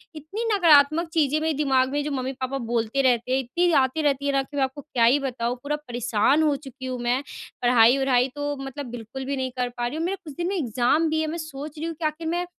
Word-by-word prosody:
इतनी 315 +10 -5
नकारात्मक 320 -3 +5
चीज़ें 305 -2 +2
मेरे 320 0 0
दिमाग 265 -3 +2
में 290 +1 -1
जो 295 - -3
मम्मी-पापा 260 0 -3
बोलते 235 +1 -1
रहते 250 -2 +1
हैं, 260 - +3
इतनी 340 +8 0
आती 260 +4 0
रहती 280 -2 0
है 285 - +2
ना 275 - +3
कि 285 +2 -10
मैं 275 - +3
आपको 265 +2 -3
क्या 255 -4 -1
ही 255 +5 +5
बताऊँ, 245 -3 -2
पूरा 295 +1 -1
परेशान 245 0 +1
हो 300 -2 +2
चुकी 270 -1 -10
हूँ 255 -1 -4
मैं। 245 +2 +1 0.4
पढ़ाई-वढ़ाई 250 +1 +4
तो 290 0 -2
मतलब 270 +1 -6
बिल्कुल 245 +3 -7
भी 280 +1 -2
नहीं 260 -1 -2
कर 250 -1 0
पा 240 0 -1
रही 275 +6 -5
हूँ। 325 - -1
मेरा 380 +3 -1
कुछ 305 -4 -9
दिन 345 - -1
में 395 - -1
एग्ज़ाम 260 - +1
भी 315 0 0
है, 315 - -1
मैं 320 +2 -3
सोच 305 -2 -7
रही 320 - -3
हूँ 330 - -5
कि 315 - -5
आखिर 310 +1 -2
मैं 350 +2 -1
275 Hz, 250 wpm, -24 LUFS, 255-310 Hz, 0.4 s, नकारात्मक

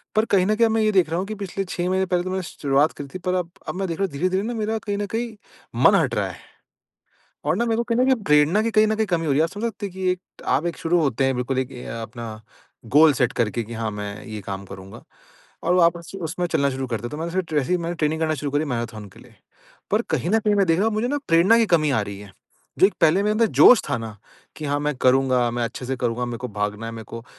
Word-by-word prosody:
पर 215 - +3
कहीं 185 -1 +4
न 215 - +2
कहीं 230 +1 +4
अब - - -1
मैं 225 - +2
ये 215 - +3
देख 185 -5 +3
रहा 165 - -1
हूँ 185 - -2
कि 215 - -5
पिछले 195 -1 -4
6 180 0 -3
महीने 190 0 +1
पहले 180 -1 0
तो 185 - -4
मैंने 190 -1 -2
शुरुआत 145 -1 +1
करी 140 - -7
थी - - -4
पर 180 - +2
अब 175 -2 -2 0.2
अब - - -4
मैं 190 0 -2
देख 165 - -4
रहा 195 - +2
हूँ 190 - -6
धीरे-धीरे 185 +6 0
न 240 +2 -3
मेरा 220 +1 -1
कहीं 205 - -1
न 205 - -1
कहीं 235 0 -2 0.5
मन - - +7
हट - - 0
रहा - - 0
है। - - -10 1.1
और - - +1
ना 235 - +1
मेरे 225 -1 +1
को - - +2
कहीं 230 0 -1
न 255 - +5
कहीं 265 - +4
प्रेरणा 150 +6 +4
की 230 - 0
कहीं 215 0 +5
न 220 - +1
कहीं 220 -1 0
कमी 165 -3 -1
हो 140 - +2
रही 135 - +2
है। - - +5
आप 165 - -3
समझ 205 +3 -6
सकते 210 -1 -6
हैं 190 - -9
कि 185 -1 0 0.4
आप 155 - -2
एक 170 - -3
शुरू 175 +2 +1
होते 135 -4 +1
हैं 135 0 +2
बिल्कुल 125 +1 -2
एक 130 0 -4
ये 125 - -9 0.2
अपना 115 +1 -8 0.7
गोल 155 -1 +8
सेट 125 0 +2
करके 120 0 -1
कि 115 +2 -8
हाँ, 110 -1 -2
मैं 105 0 -6
ये 110 -2 -6
काम 95 0 -6
करूँगा। 95 0 -11 0.6
और - - +2
वापस 170 -2 +2
से 195 - -7
उसमें 175 +2 -2
चलना 140 -5 +1
शुरू 130 0 -4
करते 115 -3 -3
हैं। 120 - -4
तो - - -6
मैंने 170 +3 -3
एस 165 -3 -7
ऐसे 155 - -2
ही 180 - +3
मैंने 170 0 -3
ट्रेनिंग 155 +1 0
करना 155 -1 +1
शुरू 145 0 -4
करी 145 +2 +1
मैराथन 115 -6 -4
के - - -15
लिए। - - -18 0.6
पर - - +3
कहीं 170 - 0
न 220 - +4
कहीं 210 -1 +2
मैं 195 - +3
देख 165 0 +2
रहा 205 - +2
हूँ 220 - -3
मुझे 220 +3 0
न 290 +2 0
प्रेरणा 175 +8 +5
की 230 - +3
कमी 155 -3 +3
आ 130 - +2
रही 100 -1 -7
है। 100 -2 -12 0.5
जो 190 - +7
पहले 170 +3 +4
मेरे 210 +1 +1
अंदर 225 +1 +3
जोश 250 - +9
था - - 0
ना 110 -2 -7 0.4
कि 155 - -7
हाँ 145 0 0
मैं 150 0 -1
करूँगा, 130 -2 +3
मैं 120 0 -2
अच्छे 125 +2 -6
से 135 - -1
करूँगा, 120 0 -1
मेरे 120 -1 -5
को 125 +1 -5
भागना 105 +1 -3
है 115 - -5
मेरे 115 -1 -8
को 115 0 -9
165 Hz, 295 wpm, -23 LUFS, 125-195 Hz, 1.1 s, जोश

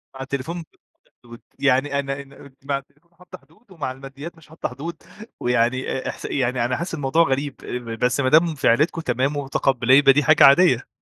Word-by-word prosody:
مع 135 - -8
التليفون 140 +6 -4
بتحطّي 160 - -23
حدود، 120 -1 -13 0.2
يعني 140 +1 +1
أنا 135 0 -4
أنا 140 0 -15
مع 140 0 -1
التليفون 145 +5 -17
حاطّة 180 +1 -13
حدود 165 - -28
ومع 150 -7 -4
الماديّات 135 +5 -10
مش 160 - -19
حاطّة 160 - -5
حدود، 155 +6 -8 0.4
ويعني 125 +1 0
أ 130 - -3
إحس - - -8
يعني 125 -3 -1
أنا 125 - -1
حاسس 175 +1 -5
الموضوع 150 +2 +2
غريب، 140 -1 -2 0.5
بس 125 +2 +1
ما 130 -2 +2
دام 160 +2 +4
في - - -1
عيلتكم 150 +8 +2
تمام 135 +1 -1
ومتقبّلاه 135 -2 +1
يبقى 140 -1 +6
دي 145 +2 +2
حاجة 155 +2 +5
عادية. 140 -4 +5
140 Hz, 190 wpm, -22 LUFS, 130-155 Hz, 0.5 s, يبقى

